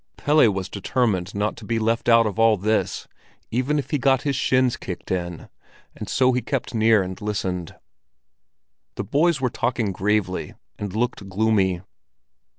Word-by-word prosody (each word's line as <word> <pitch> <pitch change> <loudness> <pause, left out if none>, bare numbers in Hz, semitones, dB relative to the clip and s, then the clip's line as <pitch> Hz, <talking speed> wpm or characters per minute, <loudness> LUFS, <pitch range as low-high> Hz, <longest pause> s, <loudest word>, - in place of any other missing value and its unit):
Pelle 145 -6 +4
was 95 -1 -3
determined 100 -3 -1
not 105 +1 -1
to - - -11
be 115 - -1
left 115 +2 0
out 115 0 +6
of 105 -1 -3
all 115 -1 +5
this, 110 +4 -1 0.4
even 130 +6 0
if 140 -2 -4
he 150 - +1
got 135 0 +2
his 140 -2 0
shins 130 -2 +2
kicked 90 -2 -7
in, 85 -2 -3 0.5
and - - -7
so 130 -1 +3
kept 125 0 -2
near 110 -2 +4
and 95 0 -7
listened. 95 -5 -3 1.2
The - - -3
boys 150 - +2
were 130 -2 0
talking 115 -3 -1
gravely 95 -1 -1 0.2
and 100 -1 -5
looked 110 -4 -2
gloomy. 95 -3 +1
110 Hz, 155 wpm, -23 LUFS, 95-125 Hz, 1.2 s, out